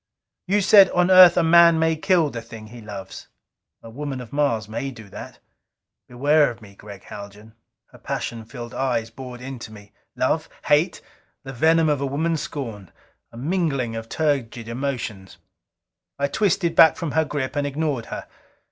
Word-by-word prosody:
You 205 +3 +2
said, 200 0 +7
'On 180 +1 +3
Earth 185 -2 +8
a 175 - +4
man 170 0 +6
may 160 0 +2
kill 165 -2 +2
the 115 - -6
thing 115 -1 -11
he 120 +1 -11
loves.' 100 -3 -9 0.6
A 115 - -10
woman 140 +1 -5
of 125 0 -10
Mars 140 -8 0
may 115 +5 -4
do 110 -6 -12
that! - - -10 0.7
Beware 145 +4 +3
of 120 -1 -9
me, 105 -3 -15
Gregg 100 0 -12
Haljan." 105 +2 -11 0.4
Her - - -16
passion 115 -1 -4
filled 120 0 -9
eyes 120 -4 -2
bored 125 0 -9
into 125 -4 -8
me. 105 -2 -14 0.2
Love? - - 0 0.2
Hate? 155 +5 +2 0.4
The 135 0 -8
venom 160 +5 +3
of 145 -2 0
a 140 - -1
woman 160 +5 -1
scorned 115 - -6 0.4
a 115 - -13
mingling 140 -5 -1
of 115 0 -7
turgid 135 -7 -2
emotions.... 115 -7 -5 0.8
I 140 0 0
twisted 175 -1 0
back 160 - +7
from 165 -4 -4
her 160 +2 +2
grip 145 -2 -4
and 145 0 0
ignored 145 -4 -2
her. - - -6
135 Hz, 170 wpm, -22 LUFS, 115-160 Hz, 0.8 s, Earth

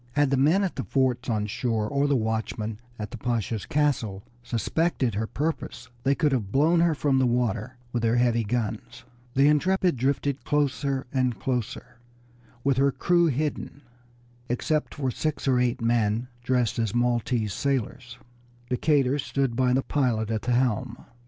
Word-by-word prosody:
Had 145 -2 +2
the - - +4
men 155 +9 +3
at 190 - -2
the - - -2
forts 130 -2 0
on 105 -2 0
shore 110 0 -1
or 140 +4 +1
the 145 - +2
watchman 110 -1 -2 0.2
at 105 -1 -6
the 120 - -7
Pasha's 115 -2 -2
castle 135 -10 0 0.2
suspected 125 +2 0
her 110 +3 -2
purpose 155 +7 -4
they 135 +3 +2
could 150 -1 +2
have 110 -7 -1
blown 160 +7 +3
her 170 -2 +3
from 140 -2 +2
the 130 - +3
water 120 0 -1 0.2
with 120 - 0
their 115 +1 +2
heavy 120 -1 +2
guns. 120 +2 -3 0.3
The 135 +2 +5
Intrepid 180 +2 +2
drifted 140 +2 0
closer 140 -2 0
and 130 -3 0
closer, 120 -1 -3 0.6
with 135 -2 +2
her 140 +1 +4
crew 175 +4 +2
hidden, 145 0 -3 0.7
except 150 +5 -1
for 135 -3 -1
six 155 +2 -3
or 130 -2 +3
eight 125 0 0
men 115 0 +1
dressed 125 -2 0
as 110 -1 -1
Maltese 120 -3 0
sailors. 130 -2 -2 0.5
Decatur 140 +1 +2
stood 135 -2 -1
by 125 0 +2
the 130 +1 +2
pilot 115 -6 0
at 110 -1 -1
the 125 - 0
helm. 125 0 0
125 Hz, 165 wpm, -26 LUFS, 115-140 Hz, 0.7 s, The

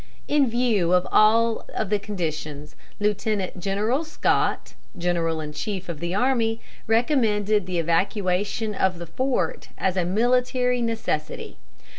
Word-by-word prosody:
In 285 -4 +3
view 225 -7 +2
of 180 0 +3
all 225 +2 +4 0.2
the 210 -1 0
conditions, 155 -7 -5 0.2
Lieutenant 205 -2 -1
General 210 - 0
Scott, 315 - 0 0.2
general 170 -2 0
in 150 -1 -5
chief 190 +3 -4
of 165 -3 -5
the 170 +2 -2
army, 230 -1 +1 0.3
recommended 215 - +2
the 180 -1 -2
evacuation 190 +5 0
of 190 -2 +1
the 170 - -6
fort 255 +10 -2
as 190 -1 0
a 180 - +1
military 250 +5 +1
necessity. 225 -10 -3
205 Hz, 125 wpm, -24 LUFS, 175-230 Hz, 0.3 s, all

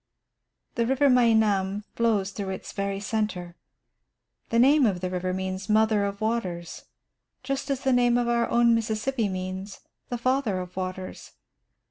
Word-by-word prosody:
The 235 -1 0
river 270 +2 +3
Meinam 215 -5 +3
flows 215 -4 +1
through 195 -1 -5
its 190 - -6
very 200 -1 -3
centre. 200 -5 -3 0.9
The 230 - +1
name 270 +2 +5
of 190 -4 -1
the 180 0 -3
river 185 0 -2
means 190 +2 -4
"Mother 215 -1 +3
of 200 +1 -5
Waters," 185 -7 -3 0.6
just 275 0 -3
as 275 -1 -1
the 265 -1 +2
name 245 -1 +4
of 240 -1 0
our 235 0 +1
own 235 0 +4
Mississippi 225 +1 0
means 185 +1 -5 0.3
"The 245 - -2
Father 255 -5 0
of 180 0 -7
Waters." 185 0 -6
215 Hz, 150 wpm, -26 LUFS, 190-235 Hz, 0.9 s, name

